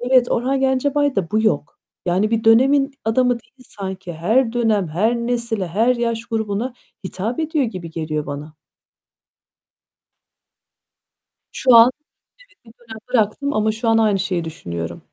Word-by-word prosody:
Evet, 250 0 +3
Orhan 265 +3 0
Gencebay'da 265 - +1
bu 215 +1 +2
yok. 150 -10 -1 0.3
Yani 190 +5 +1
bir 225 -1 0
dönemin 275 +5 +4
adamı 250 +3 +2
değil - - -31
sanki. 190 -3 -7
Her 225 +9 +1
dönem, 220 -6 +1
her 210 +10 +1
nesile, 235 -4 -1
her 230 +8 +2
yaş 230 -1 -2
grubuna 225 +2 -2 0.3
hitap 215 +7 -4
ediyor 315 -3 0
gibi 185 -8 -6
geliyor 155 -2 -3
bana. 145 +2 -7 3.0
Şu 255 -2 +4
an 230 +2 +8 0.5
evet, 405 - -30
bir 225 - -15
dönem 225 -2 -11
bıraktım 250 +5 0
ama 215 -2 +1
şu 225 +1 -2
an 225 - +4
aynı 215 -3 +2
şeyi 185 -3 -1
düşünüyorum. 85 - -6
225 Hz, 140 wpm, -20 LUFS, 190-245 Hz, 3.0 s, an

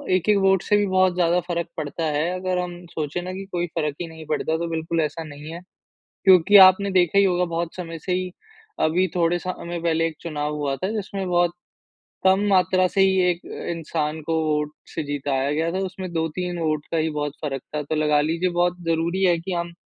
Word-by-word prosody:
1-1 200 +3 +3
vote 190 -1 +4
से 210 - +3
भी 205 - +2
बहुत 185 -1 +3
ज़्यादा 175 0 +2
फ़र्क 170 -1 -2
पड़ता 155 +1 -4
है, 155 +2 0
अगर 185 0 -1
हम 175 0 -5
सोचे 155 +3 -3
ना 185 +1 -5
कि 195 +1 -6
कोई 175 0 -1
फ़र्क 150 -2 -1
ही 175 - -3
नहीं 160 -1 -11
पड़ता 155 +1 -1
तो 170 +1 -3
बिल्कुल 165 0 -1
ऐसा 155 +1 -3
नहीं 150 0 -9
है 170 - -7 0.6
क्योंकि 190 +1 +7
आपने 200 +2 0
देखा 185 0 +3
ही 200 - +6
होगा 180 -2 +2
बहुत 170 0 -2
समय 165 -2 -6
से 185 - 0
ही 185 0 -1 0.5
अभी 175 +4 +2
थोड़े 170 0 +2
समय 175 -1 -5
पहले 165 -1 +1
एक 165 - -4
चुनाव 150 -2 -3
हुआ 145 -2 -2
था, 185 - -3
जिसमें 200 -2 -4
बहुत 175 -1 +2 0.7
कम 190 0 +5
मात्रा 185 -1 +3
से 195 +2 +1
ही 190 0 +4
एक 175 0 -1 0.3
इंसान 160 -1 -3
को - - +2
वोट 150 -1 0 0.2
से 160 - -2
जीताया 140 -1 -1
गया 160 +3 0
था 185 - -2
उसमें 185 -1 -6
2-3 175 +2 -2
वोट 155 -2 -1
का 165 - 0
ही 160 0 +1
बहुत 150 -2 -3
फ़र्क 135 -3 -3
था, 150 - 0
तो 145 - -3
लगा 150 -1 +3
लीजिए 165 +4 0
बहुत 175 0 +1
ज़रूरी 165 +3 0
है 175 -2 +4
कि 175 +3 -6
हम 170 0 -3
170 Hz, 215 wpm, -23 LUFS, 155-185 Hz, 0.7 s, क्योंकि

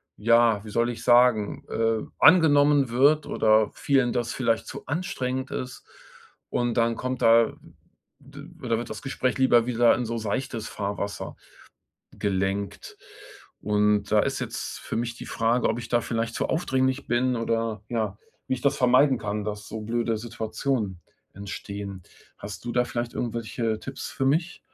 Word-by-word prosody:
ja, 115 -1 +3
wie 110 - -9
soll 115 +3 +1
ich 120 - -8
sagen, 120 -4 +3
äh, 115 -1 0
angenommen 145 -5 +5
wird 145 +5 +4
oder 110 -1 +3
vielen 135 -4 +1
das 120 -1 -1
vielleicht 115 -3 0
zu - - -8
anstrengend 130 -5 -3
ist, 125 -1 -5 0.7
und 120 -1 0
dann 115 -1 +2
kommt 130 0 -3
da 115 0 +5 0.7
d 140 0 -14 0.2
oder 115 -2 0
wird 120 0 -5
das - - -7
Gespräch 130 -2 -1
lieber 120 -3 +4
wieder 120 -1 +4
in 120 - -2
so 115 +1 -3
seichtes 115 +1 -3
Fahrwasser 100 0 -4 0.8
gelenkt. 95 0 -3 0.6
Und 105 0 +2
da 105 - +5
ist - - -1
jetzt - - -5
für - - -5
mich 120 0 -2
die - - -9
Frage, 115 +2 +1
ob - - -1
ich 120 -1 -7
da 120 - +2
vielleicht 115 0 -3
zu - - -1
aufdringlich 130 -5 0
bin 125 +1 +1
oder, 115 -2 -1
ja, 110 -4 -2 0.3
wie - - +1
ich 125 - -8
das 140 +1 +2
vermeiden 130 +1 +4
kann, 105 -1 -3
dass 105 0 -5
so 110 - -6
blöde 115 +1 -1
Situationen 110 -3 -3 0.3
entstehen. 100 -1 -7 0.4
Hast 100 +2 -8
du 120 - -3
da 125 0 +2
vielleicht 120 0 -4
irgendwelche 115 -1 -2
Tipps 135 0 -6
für 135 - -3
mich? 165 +6 0
115 Hz, 160 wpm, -25 LUFS, 110-130 Hz, 0.8 s, angenommen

